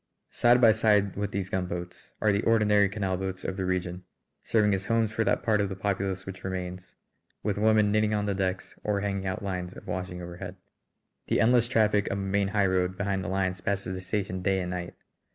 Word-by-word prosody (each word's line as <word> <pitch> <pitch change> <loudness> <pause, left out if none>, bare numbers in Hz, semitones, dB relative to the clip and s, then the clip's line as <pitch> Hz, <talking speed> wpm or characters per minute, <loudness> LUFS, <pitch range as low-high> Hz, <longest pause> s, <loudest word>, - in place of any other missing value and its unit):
Side 120 +1 +4
by 115 -3 +7
side 105 -3 +2
with 100 +1 -2
these 95 -1 -3
gunboats 90 -1 -4
are 110 - +4
the 100 +1 +1
ordinary 105 -3 +4
canal 95 -2 -2
boats 95 0 -4
of 95 - -2
the 95 -1 -2
region, 90 0 -2 0.4
serving 105 -2 +2
as 95 +1 -2
homes 115 -1 +2
for 115 +1 0
that - - +1
part 105 -1 +2
of 100 - 0
the 95 - -4
populace 95 -1 -2
which 95 -1 -8
remains, 90 -1 -5 0.5
with 105 -1 -1
women 110 -1 +4
knitting 110 0 +2
on 105 -1 0
the 100 - 0
decks 95 -1 -2
or 105 -1 0
hanging 100 -1 -2
out 95 +1 -3
lines 90 -2 -4
of - - -12
washing 90 -1 -4
overhead. 85 0 -7 0.7
The - - +1
endless 120 +1 +4
traffic 105 -4 +2
of 100 - -1
a - - -3
main 100 0 +1
highroad 95 -3 +1
behind 100 -1 -1
the - - -4
lines 95 -1 -1
passes 100 -2 -2
the 95 - -5
station 95 -1 -2
day 95 +1 +1
and 90 0 -4
night. 90 -1 -5
100 Hz, 210 wpm, -28 LUFS, 95-105 Hz, 0.7 s, by